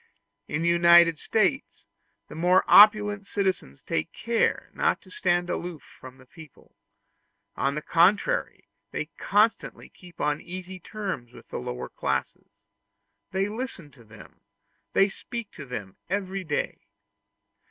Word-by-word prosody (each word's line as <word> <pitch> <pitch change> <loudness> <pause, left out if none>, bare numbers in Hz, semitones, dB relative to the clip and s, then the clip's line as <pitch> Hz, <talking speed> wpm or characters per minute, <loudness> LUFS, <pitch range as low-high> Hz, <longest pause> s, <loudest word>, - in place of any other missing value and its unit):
In 155 +3 -2
the - - +1
United 170 -1 +6
States 220 +4 -1 0.4
the - - -11
more 180 +4 +3
opulent 210 -1 +6
citizens 190 - -2
take 80 0 -2
great - - -14
care 230 -1 0
not - - +1
to 185 - -18
stand 175 -2 0
aloof 175 -3 -5 0.2
from 130 0 -12
the 130 - -18
people; 155 +2 -16 0.8
on 135 +2 0
the 150 - -4
contrary, 200 - +2 0.2
they 155 +2 -5
constantly 210 +2 +1
keep 180 -2 -17
on 150 0 0
easy 185 +1 -8
terms 180 - -6
with - - -15
the - - -5
lower 60 - -5
classes: - - -3 0.8
they 190 +1 -1
listen 210 - -6
to 125 -4 -18
them, 110 -3 -16 0.5
they 195 - +5
speak 235 +2 -7
to 145 -4 -10
them 105 -6 -7
every 195 0 -2
day. 150 -4 -2
175 Hz, 140 wpm, -26 LUFS, 150-200 Hz, 0.8 s, United